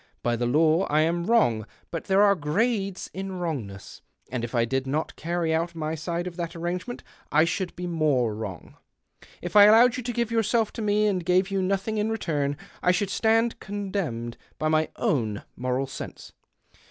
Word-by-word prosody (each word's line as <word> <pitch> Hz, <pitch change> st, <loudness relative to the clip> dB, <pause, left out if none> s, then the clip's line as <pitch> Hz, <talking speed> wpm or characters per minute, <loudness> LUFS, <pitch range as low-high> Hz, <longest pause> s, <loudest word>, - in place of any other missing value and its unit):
By 120 Hz, 0 st, +1 dB
the 120 Hz, +1 st, -1 dB
law 160 Hz, +7 st, +3 dB
[ -, -, -7 dB
am 165 Hz, +3 st, +2 dB
wrong, 120 Hz, -, +3 dB, 0.2 s
but 165 Hz, -, -4 dB
there 195 Hz, +1 st, +4 dB
are 200 Hz, -1 st, +6 dB
grades 195 Hz, +4 st, -1 dB
in 190 Hz, 0 st, -5 dB
wrongness, 135 Hz, -, -5 dB, 0.3 s
md 125 Hz, -2 st, -2 dB
if 120 Hz, +2 st, -4 dB
I 115 Hz, -1 st, +3 dB
did 135 Hz, +2 st, -1 dB
not 150 Hz, +4 st, -2 dB
carry 170 Hz, 0 st, -1 dB
out 165 Hz, +1 st, -1 dB
my 155 Hz, -1 st, -2 dB
side 170 Hz, +2 st, -3 dB
of 180 Hz, -1 st, -6 dB
that 170 Hz, -1 st, -3 dB
irrano'ement 180 Hz, +8 st, -4 dB, 0.3 s
I 155 Hz, +2 st, +5 dB
should 185 Hz, +1 st, -2 dB
he 180 Hz, -, -4 dB
more 150 Hz, -9 st, +1 dB
wrono. 105 Hz, -5 st, -7 dB, 0.7 s
If 175 Hz, +2 st, -5 dB
I 205 Hz, 0 st, +10 dB
illowed 235 Hz, +3 st, +6 dB
you -, -, -3 dB
to 245 Hz, +1 st, -3 dB
give 235 Hz, -1 st, -1 dB
yourself 225 Hz, 0 st, +1 dB
to -, -, -5 dB
me 210 Hz, 0 st, +2 dB
and 190 Hz, -4 st, +1 dB
gave 185 Hz, +2 st, +2 dB
>^ou 195 Hz, -1 st, 0 dB
nothing 195 Hz, +3 st, -1 dB
in 210 Hz, +1 st, 0 dB
return, 145 Hz, -10 st, -1 dB, 0.2 s
I -, -, +2 dB
should 185 Hz, +2 st, +1 dB
stand 225 Hz, +2 st, +2 dB
con 205 Hz, 0 st, -5 dB
lemned 120 Hz, -, -3 dB, 0.2 s
l)y 155 Hz, -, +1 dB
my 155 Hz, 0 st, +2 dB
own 120 Hz, -, -1 dB
moral 130 Hz, +2 st, -1 dB
sense. 135 Hz, -, -8 dB
175 Hz, 190 wpm, -26 LUFS, 145-205 Hz, 0.7 s, I